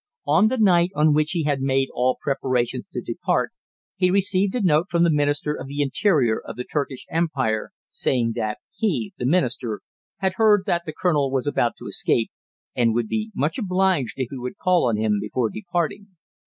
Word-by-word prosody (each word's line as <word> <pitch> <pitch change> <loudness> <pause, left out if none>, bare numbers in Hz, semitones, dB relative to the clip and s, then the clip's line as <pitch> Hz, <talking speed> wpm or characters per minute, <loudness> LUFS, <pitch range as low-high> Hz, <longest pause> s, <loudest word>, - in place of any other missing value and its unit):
On 215 - +4
the 260 - 0
night 180 -5 +4
on 150 0 +4
which 150 0 +2
he 170 -3 0
had 145 -2 0
made 135 0 +1
all 125 +1 +1
preparations 130 -3 -1
to - - -5
depart - - -1 0.4
he 180 -1 +2
received 195 +1 +1
a 245 - 0
note 165 0 +3
from 170 -1 +2
the 170 - +4
Minister 145 0 +1
of 140 - -7
the 145 +1 -1
Interior 140 - +2
of - - -8
the 125 - -4
Turkish 140 -2 -4
Empire 140 -10 0 0.2
saying 120 -3 0
that 110 -2 -2 0.2
he, 210 -2 -1
the 125 - 0
Minister, 125 - 0 0.4
had 190 -1 0
heard 210 -3 +5
that 170 -1 -1
the 155 - -4
colonel 150 -6 +2
was 130 -1 -1
about 120 -5 +1
to - - -11
escape, 115 - 0 0.4
and 115 -2 +2
would 120 -2 0
be 220 0 -2
much 150 - -1
obliged 185 - +1
if 130 -3 -2
he 135 - -6
would 125 0 -6
call 180 -7 +2
on 110 - 0
him 105 -1 +1
before 110 +2 -1
departing. 175 0 -3
150 Hz, 195 wpm, -23 LUFS, 125-180 Hz, 0.4 s, heard